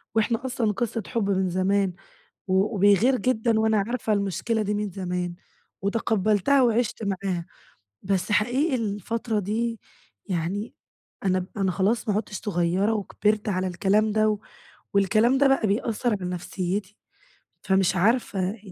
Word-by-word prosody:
وإحنا 225 +2 +1
أصلًا 245 -4 0
قصة 225 +1 -2
حب 225 -5 -1
من 190 -1 +1
زمان، 190 +1 +1 0.6
و 190 +4 +2
وبيغير 205 +6 +4
جدًا 230 -3 +1
وأنا 220 -1 +3
عارفة 240 -2 -1
المشكلة 205 +3 0
دي 210 0 -1
من 210 0 -2
زمان، 180 -1 -3 0.5
وتقبّلتها 215 +4 +2
وعِشت 235 -2 +1
معاها، 190 -3 -2 0.6
بس 190 0 -1
حقيقي 255 +8 +2
الفترة 220 0 -2
دي 225 +3 -2 0.5
يعني، 190 +5 -3 0.5
أنا 185 -1 +2
ب 180 - -6
أنا 195 -2 +1
خلاص 205 +6 0
ما 205 - +2
عدتش 210 0 -3
صغيرة 185 +1 +1
وكبرت 210 +1 0
على 185 -1 0
الكلام 200 +4 +2
ده، 215 0 +3
و 210 -1 -1 0.5
والكلام 215 +6 +3
ده 280 +1 +5
بقى 270 -5 +2
بيأثر 225 +3 0
على 180 - -3
نفسيتي، 185 +3 -3 0.7
فمش 190 -1 +2
عارفة 200 -1 +1
205 Hz, 140 wpm, -25 LUFS, 190-225 Hz, 0.7 s, ده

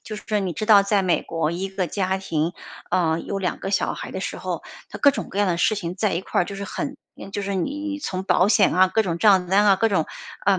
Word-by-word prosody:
就 215 - -7
是 210 0 -2
你 190 -3 -2
知 215 - -3
道 210 -2 +7
在 200 0 +1
美 180 -2 +2
国， 165 -2 -2
一 180 +3 -3
个 190 -1 -2
家 190 +2 -1
庭， 165 -4 -2 0.4
呃， 165 -2 +1
有 200 - -4
2 185 -2 -2
个 195 - -4
小 200 - +1
孩 - - -7
的 - - -5
时 - - -4
候， - - -4 0.3
它 - - -8
各 285 - +6
种 - - -5
各 195 - -6
样 205 - +3
的 175 -2 0
事 215 - +3
情 175 -4 -4
在 200 0 0
一 170 - -2
块 - - 0
儿， - - +2
就 200 +2 -7
是 200 - -5
很 275 +8 -5 0.4
就 205 - -3
是 200 0 -3
你 295 - -3
从 185 -9 -4
保 190 0 +3
险 210 -2 +4
啊， 185 +1 +5
各 220 +4 +2
种 170 -4 -3
账 190 -2 +4
单 200 +3 +4
啊， 195 -2 +6
各 225 +4 +2
种 160 -5 +1 0.4
呃， 195 -2 +4
195 Hz, 285 characters per minute, -23 LUFS, 180-205 Hz, 0.4 s, 道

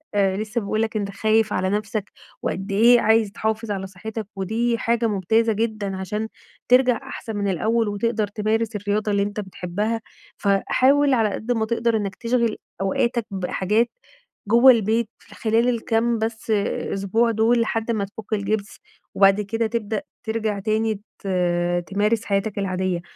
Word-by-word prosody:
آآ، 195 -1 +2
لسه 215 +2 -2
باقول 215 +2 -1
لك 225 0 -2
أنت 200 -1 -2
خايف 215 +1 +2
على 185 0 0
نفسك، 210 0 -2 0.3
وقد 195 +2 -3
إيه 235 +4 +6
عايز 220 -1 +3
تحافظ 220 +1 -2
على 195 -1 -3
صحتك 215 +3 -7
ودي 225 +5 0
حاجة 230 0 +1
ممتازة 220 +3 +2
جدًا 215 -3 -2
عشان 210 +3 -3 0.4
ترجع 250 -1 +5
أحسن 220 -2 -7
من 200 -1 -1
الأول، 220 +5 +1
وتقدر 215 +1 0
تمارس 215 +2 -1
الرياضة 205 +1 -1
اللي 200 0 +2
أنت 205 +2 -4
بتحبها، 205 +3 -3 0.4
فحاول 260 +8 +3
على 225 -4 +3
قد 230 +3 -3
ما 225 -2 +1
تقدر 230 0 0
إنك 200 -2 -3
تشغِل 235 -2 0 0.2
أوقاتك 235 +4 0
بحاجات 195 +4 0 0.6
جوا 240 +3 +8
البيت، 225 0 +1
في - - -17
خلال 230 +2 +2
الكام 230 0 +1
بس 220 0 -3 0.4
أسبوع 210 +4 +1
دول 230 +2 +3
لحد 225 0 -1
ما 210 -3 0
تفُك 210 +2 -8
الجبس 205 0 -2 0.4
وبعد 195 +1 +5
كده 225 +3 -1
تبدأ 220 0 -2 0.2
ترجع 220 -2 -2
تاني 215 0 0 0.2
ت - - -9 0.6
تمارس 210 +3 +1
حياتك 200 +1 -1
العادية، 185 -2 -1
215 Hz, 155 wpm, -23 LUFS, 200-230 Hz, 0.6 s, جوا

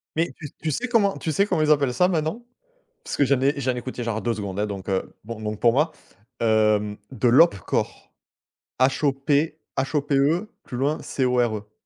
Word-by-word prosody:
Mais, 165 +2 0
tu 150 -3 -8
tu 160 - -1
sais 250 - -2
comment 210 -5 +2
tu 160 - -3
sais 195 +7 +2
comment 180 -6 0
ils 155 - +3
appellent 140 -4 +3
ça 180 +7 +3
maintenant? 175 +6 -2 0.6
Parce - - -4
que 145 - +4
j'en 135 0 +2
ai 140 +2 +2
j'en 130 -1 0
ai - - -4
écouté 125 0 -5
genre 110 -1 -2
2 120 -1 0
secondes, 100 -2 -5
hein, 105 - +1
donc, 100 -2 -7
heu, 95 -1 -2
bon 115 0 -7
donc 105 -1 -4
pour 120 - +5
moi, 150 +6 +2 0.5
hem, 110 -2 +2
de 125 -2 +1
l'Hope 125 - +6
Core. 85 - -3 0.7
H 130 +3 +2
O 140 - +5
P 145 +3 0 0.2
H 135 +3 -1
O - - +2
P 145 0 -1
E 165 +9 +2 0.2
plus 125 - -7
loin 145 +4 0
C 130 - -1
O 125 0 +1
R 115 -3 +1
E 105 0 -13
135 Hz, 235 wpm, -24 LUFS, 110-155 Hz, 0.7 s, l'Hope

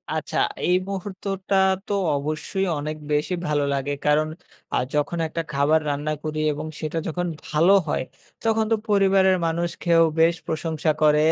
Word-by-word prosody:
আচ্ছা, - - -3 0.3
এই 180 - +4
মুহূর্তটা 195 0 -3 0.3
তো 205 - -1 0.2
অবশ্যই 155 +7 -2
অনেক 155 +1 -4
বেশি 150 +5 +1
ভালো 150 -1 +1
লাগে। 140 +1 -1
কারণ 150 +1 +3 0.5
আ - - +3 0.2
যখন 150 +3 0
একটা 165 +1 -3
খাবার 145 +3 +3
রান্না 145 +2 -1
করি 155 0 -3
এবং 150 +2 -5
সেটা 155 +1 -3
যখন 175 +2 -2 0.2
ভালো 165 +6 +4
হয় - - 0 0.4
তখন 220 -1 +2
তো - - +5
পরিবারের 195 -2 +4
মানুষ 170 +1 -1
খেয়েও 165 -1 +5 0.2
বেশ 165 +1 +5
প্রশংসা 160 0 -1
করে। 150 0 +5
160 Hz, 155 wpm, -23 LUFS, 150-190 Hz, 0.5 s, তো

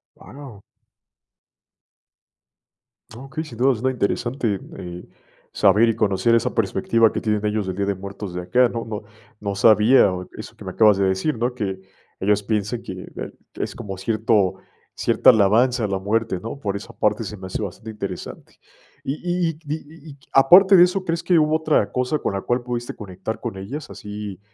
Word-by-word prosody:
Guau. 130 -8 -12 2.6
Okey, 135 +5 -6
sin 120 -8 -11
duda, 130 +2 +3
suena 125 +3 -1
interesante, 120 -2 -1 0.2
eh, 90 0 -8 0.5
saber 105 +3 +4
y 115 - 0
conocer 105 +1 +2
esa 115 - 0
perspectiva 115 -2 +2
que - - -2
tienen 105 -1 -1
ellos 105 -1 -1
del 95 -1 -4
Día 100 0 -1
de 100 - 0
Muertos 100 -1 -7
de 90 - -3
acá, 125 +7 +3
¿no?, 115 -1 -4
no 105 -2 -5 0.4
no 100 -1 -3
sabía 110 +1 +5 0.3
eso - - -9
que - - -13
me - - -5
acabas 105 -3 +5
de 100 - +2
decir, 95 +10 0
¿no?, 120 +2 -2
que 95 -5 -4 0.4
ellos 105 +1 +1
piensen 110 +2 -2
que 95 0 -8
bue - - -6 0.2
es - - -4
como 95 -2 -7
cierto, 110 -2 +1 0.4
cierta - - +4
alabanza 115 +3 +3
a - - 0
la 95 -1 -1
muerte, 105 0 -1
¿no?, 115 +8 -7
por 100 -5 -3
esa 100 - -8
parte 105 +2 +1
se 105 +1 -6
me 95 -1 -9
hace 100 - -4
bastante 105 +4 -7
interesante, 100 -4 -7 0.4
y 135 - -2
y 175 -1 0
y 160 -1 -7
di 145 +1 -2
y 160 0 -14
y 140 - -14
aparte 185 +9 +7
de 175 - +9
eso, 185 +1 +1
¿crees 170 -1 -2
que 175 -3 +4
hubo 155 0 +2
otra 155 -9 +1
cosa 125 +4 -1
con - - -2
la 95 - -2
cual 120 +4 0
pudiste 120 -1 -4
conectar 100 +2 -6
con 95 - -5
ellas?, 130 +11 -7
así, 105 -2 -7
110 Hz, 185 wpm, -22 LUFS, 100-130 Hz, 2.6 s, de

